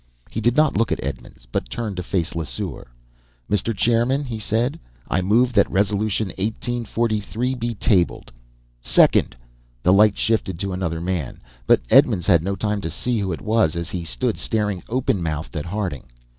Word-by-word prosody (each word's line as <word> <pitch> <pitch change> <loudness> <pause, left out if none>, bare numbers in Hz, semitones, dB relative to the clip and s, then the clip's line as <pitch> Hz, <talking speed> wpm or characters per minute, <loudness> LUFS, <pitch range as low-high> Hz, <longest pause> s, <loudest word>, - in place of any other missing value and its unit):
He 110 - -3
did 120 +4 +2
not 155 -1 +4
look 115 +1 +1
at - - -1
Edmonds, - - -7
but - - -2
turned 105 - -4
to - - -1
face 90 -1 -1
Lesseur. 80 -3 -4 0.6
"Mr. 105 +2 0
Chairman," 120 +6 +2
he 120 -5 -5
said, 115 +5 -1 0.3
"I - - 0
move 120 +7 +3
that 100 -3 +4
Resolution 105 +1 0
1843 115 +1 -1
be 120 -2 -3
tabled!" 100 -4 +1 0.5
"Second!" - - +4 0.5
The 90 - +5
light 105 +1 +5
shifted 110 -6 0
to 100 +1 -3
another 85 -3 -2
man, 85 -7 -3 0.3
but - - +5
Edmonds 90 - +5
had 85 -5 +5
no 100 +4 -2
time 105 +1 -1
to 80 - -3
see 115 +9 -1
who 95 -2 -1
it 80 - -4
was 110 -7 +2
as 85 0 -4
he 90 -2 -3
stood - - -2
staring 105 -4 -1
open 120 -5 0
mouthed 80 +2 -4
at 75 - -3
Harding. 90 -6 -3
105 Hz, 170 wpm, -22 LUFS, 90-115 Hz, 0.6 s, The